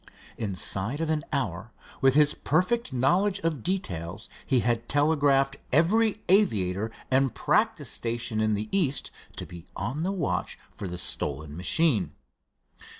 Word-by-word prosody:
Inside 100 +4 -1
of 165 -1 0
an 155 -2 0
hour, 115 - -2 0.3
with 135 0 +4
his 150 0 +5
perfect 185 +9 0
knowledge 180 +11 +2
of 160 - -1
details, 95 - -3 0.2
he 130 -3 +3
had 120 0 -1
telegraphed 145 -2 +3
every 210 - +3
aviator 110 - +2 0.2
and 130 -1 +2
practice - - +1
station 115 -1 -2
in 110 -1 +2
the 105 +1 -3
East 160 -8 +1 0.2
to - - -6
be 85 0 -11
on 135 +6 -3
the 185 +3 0
watch 180 -7 -2
for 100 - -7
the 90 0 -5
stolen 75 -3 -2
machine. 100 - +1
135 Hz, 140 wpm, -27 LUFS, 105-160 Hz, 0.3 s, his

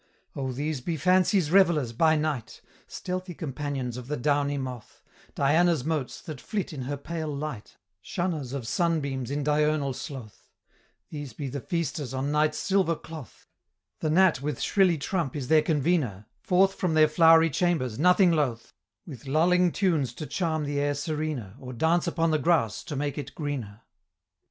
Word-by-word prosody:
"Oh, 135 -2 -3
these 145 +2 -3
be 165 +5 -3
Fancy's 180 +1 +3
revelers 170 -10 +4
by 160 +6 +4
night! 150 -7 -3 0.3
Stealthy 185 -1 -5
companions 135 -4 -4
of 125 -1 -8
the 150 +1 -2
downy 145 +2 +1
moth 130 -4 -7 0.3
Diana's 155 0 +3
motes, 155 -5 -2
that 155 -5 -8
flit 200 -4 -3
in 140 - -5
her 145 +2 -3
pale 160 +3 -5
light, 145 -6 -6 0.2
Shunners 160 - -3
of 135 -4 -5
sunbeams 140 -5 -1
in 145 +1 -2
diurnal 150 -1 +1
sloth; 125 -4 -9 0.6
These 145 -5 -7
be 140 +3 -5
the 140 +1 -5
feasters 155 -6 -3
on 135 +2 -1
night's 150 0 +2
silver 190 -4 +1
cloth; 155 -7 -11 0.5
The 155 - -1
gnat 170 -4 +4
with 145 -2 -3
shrilly 185 -4 +3
trump 155 -1 -2
is 135 -4 -4
their 155 -1 +6
convener, 145 - 0 0.2
Forth 190 +2 +3
from 175 -5 -1
their 155 0 +6
flowery 165 +1 +5
chambers, 135 -8 0
nothing 180 +2 +5
loth, 130 -8 -1 0.3
With 140 -4 -10
lulling 175 +5 +3
tunes 155 - 0
to 155 - -6
charm 160 -2 -1
the 145 0 -2
air 145 0 0
serener, 150 - -3
Or 130 -1 -8
dance 165 +8 +1
upon 165 -1 +1
the 155 - +2
grass 140 -8 +1
to 150 - -5
make 145 +1 -2
it 145 - -7
greener." 125 -9 -5
150 Hz, 165 wpm, -27 LUFS, 135-165 Hz, 0.6 s, their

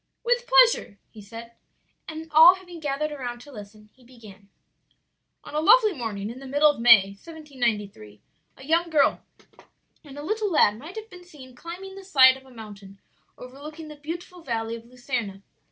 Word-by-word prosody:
"With 485 0 0
pleasure," - - +4
he 215 - -13
said, 230 +3 -11 0.6
and 320 0 -8
all 325 +4 +8
having 355 -2 -12
gathered 300 0 -3
around 250 -4 -6
to 290 - -14
listen, 210 -2 -13
he 260 - -25
began. 215 -5 -16 0.9
"On - - -12
a 300 - 0
lovely 430 +5 +5
morning 220 - -5
in 250 - -11
the 270 - -10
middle 290 +3 +4
of 290 - -11
May, 225 -5 +7
1793, 215 - -5 0.4
a 265 - -14
young 335 +3 +1
girl 305 -3 +2 0.8
and 285 -2 -13
a 290 - -7
little 425 +3 -2
lad 215 -9 +3
might 315 +8 -11
have 440 -1 -9
been 360 -1 -13
seen 280 -7 -15
climbing 360 +7 -9
the 390 0 -11
side 260 -9 +6
of 265 0 -16
a - - -17
mountain 205 -4 -12 0.4
overlooking 300 +5 -11
the 300 - -10
beautiful 340 +4 -8
Valley 230 -5 -4
of 230 0 -12
Luserna. 240 -6 -5
275 Hz, 175 wpm, -24 LUFS, 225-330 Hz, 0.9 s, all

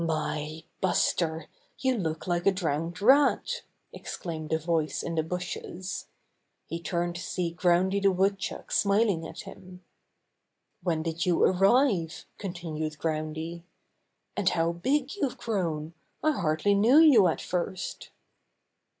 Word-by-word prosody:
^^My, 155 -1 -2 0.2
Buster, 165 -3 +1 0.3
you 260 -1 +1
look 160 -7 -3
like 175 0 0
a - - +7
drowned 165 -1 -2
rat!" 285 - +4 0.3
exclaimed 160 -3 -6
a 160 - +3
voice 160 -1 -1
in 170 - -3
the 160 - +1
bushes. 180 +2 -5 0.6
He 165 +1 -5
turned 175 0 -2
to - - -6
see 175 -3 -2
Groundy 180 +3 +2
the 195 0 +4
Woodchuck 195 +1 -1
smiling 200 -5 +2
at - - -8
him. 180 0 -12 1.0
'When 165 -3 0
did 165 +2 -2
you 175 - +3
arrive?" 195 - +3
continued 160 -5 -4
Groundy. 160 +1 -3 0.7
"And 190 -2 +2
how 165 0 +1
big 265 - 0
you've 280 -10 -1
grown! 165 -7 -2 0.3
I 310 - +4
hardly 175 - +1
knew 220 +8 +5
you 280 - +7
at 160 - 0
first." 180 +1 -4
175 Hz, 130 wpm, -28 LUFS, 160-200 Hz, 1.0 s, a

